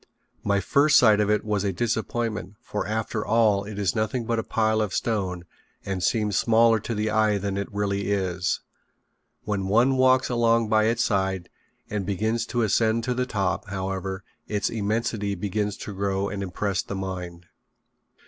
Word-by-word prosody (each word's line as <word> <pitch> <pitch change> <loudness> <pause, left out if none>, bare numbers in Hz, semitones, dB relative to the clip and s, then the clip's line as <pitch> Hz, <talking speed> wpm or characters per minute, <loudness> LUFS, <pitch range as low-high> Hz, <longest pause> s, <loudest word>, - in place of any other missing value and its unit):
My 100 0 +2
first 145 +8 +4
sight 110 -4 +6
of 105 -1 +2
it 105 0 +1
was 105 -2 0
a 100 - 0
disappointment 110 -1 -2
for 105 - -3
after 110 0 -2
all 110 -3 +3
it 105 0 -7
is 100 0 0
nothing 115 +2 -1
but 115 0 0
a - - -2
pile 110 0 +1
of 105 -4 -2
stone, 95 -6 -2 0.4
and 95 -2 -3
seems 105 +1 +1
smaller 115 +1 +4
to 115 - -4
the 105 +1 -1
eye 110 -1 +3
than 100 0 -3
it 100 0 -3
really 100 -1 -1
is. 90 -2 -1 0.8
When 100 -2 -2
one 120 +6 +3
walks 130 0 +4
along 115 -2 +2
by 110 0 +4
its 115 +1 +2
side 95 -3 -1 0.4
and 105 -2 -3
begins 110 +4 -1
the 120 - -1
ascent 110 +1 +2
to 125 - 0
the 125 +1 -1
top, 100 -5 -1
however, 95 0 -4 0.2
its 105 -1 -1
immensity 105 -1 -1
begins 105 +2 -2
to 105 - -6
grow 100 0 -1
and 100 - -4
impress 100 +1 -1
the 100 - -6
mind. 90 -2 -5
105 Hz, 175 wpm, -25 LUFS, 100-115 Hz, 0.8 s, sight